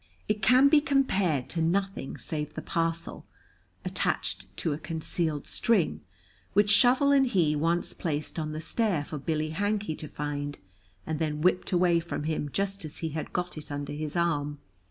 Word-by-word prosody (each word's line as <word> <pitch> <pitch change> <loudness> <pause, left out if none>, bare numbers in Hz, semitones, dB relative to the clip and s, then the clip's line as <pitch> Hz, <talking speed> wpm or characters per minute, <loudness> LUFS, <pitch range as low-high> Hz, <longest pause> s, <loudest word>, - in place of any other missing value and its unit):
It 210 0 0
can 255 +6 +6
be 295 +1 +6
compared 195 - +1
to 165 - -2
nothing 190 -3 -1
save 150 -1 -3
the 155 - -5
parcel 165 0 -2 0.6
(attached - - -1
to 160 - 0
a 145 - -5
concealed 160 -2 -2
string) 225 -8 +1 0.5
which 205 0 +4
Shovel 255 +6 +5
and 270 -1 +5
he 170 -9 +2
once 165 +3 +1
placed 155 -1 -3
on 155 -1 -3
the 155 +1 -4
stair 175 -3 0
for 150 - -5
Billy 155 +1 -1
Hankey 205 0 -1
to 155 - -6
find, 145 0 -4 0.5
and 155 -1 -3
then 150 -2 -1
whipped 180 +3 +2
away 175 -2 +4
from 170 -3 -4
him 155 -1 -2
just 195 +2 -1
as 155 -1 -7
he 165 - -3
had 155 +1 -5
got 180 -3 -3
it 150 - -8
under 145 0 -4
his 150 +1 -4
arm. 150 -4 0
165 Hz, 175 wpm, -28 LUFS, 150-195 Hz, 0.6 s, can